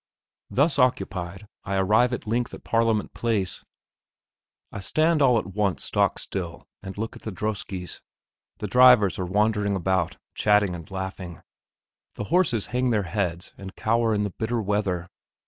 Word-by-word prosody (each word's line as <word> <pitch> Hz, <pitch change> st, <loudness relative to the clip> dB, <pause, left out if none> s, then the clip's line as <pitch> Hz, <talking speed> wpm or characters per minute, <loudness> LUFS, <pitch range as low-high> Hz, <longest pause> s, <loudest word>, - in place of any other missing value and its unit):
Thus 140 Hz, +2 st, +2 dB
occupied, 100 Hz, -6 st, 0 dB, 0.2 s
I 100 Hz, -, -2 dB
arrive 105 Hz, +6 st, +3 dB
at 120 Hz, -, -4 dB
length 120 Hz, +3 st, -1 dB
at -, -, -14 dB
Parliament 115 Hz, -2 st, +1 dB
Place. 105 Hz, -6 st, -1 dB, 1.1 s
I -, -, -6 dB
stand 155 Hz, -, +2 dB
all 125 Hz, -4 st, +5 dB
at 100 Hz, -3 st, -3 dB
once 100 Hz, -2 st, 0 dB
stock -, -, +1 dB
still, 85 Hz, -4 st, -5 dB, 0.2 s
and 95 Hz, 0 st, -8 dB
look 110 Hz, +2 st, -4 dB
at -, -, -12 dB
the 110 Hz, -, -5 dB
droskes; 95 Hz, -2 st, -4 dB, 0.6 s
the -, -, -5 dB
drivers 125 Hz, -3 st, +6 dB
are 90 Hz, -, -2 dB
wandering 105 Hz, +1 st, +1 dB
about, 95 Hz, -2 st, 0 dB, 0.2 s
chatting 105 Hz, -3 st, +3 dB
and 85 Hz, -2 st, -8 dB
laughing. 95 Hz, -3 st, -6 dB, 0.7 s
The -, -, -4 dB
horses 145 Hz, -, +3 dB
hang 125 Hz, 0 st, +1 dB
their 105 Hz, -4 st, +1 dB
heads 90 Hz, -2 st, -3 dB
and 95 Hz, -1 st, -9 dB
cower 115 Hz, +1 st, +1 dB
in 105 Hz, -, 0 dB
the 100 Hz, -, -2 dB
bitter 115 Hz, +1 st, 0 dB
weather. 100 Hz, -4 st, -1 dB
105 Hz, 155 wpm, -25 LUFS, 95-115 Hz, 1.1 s, drivers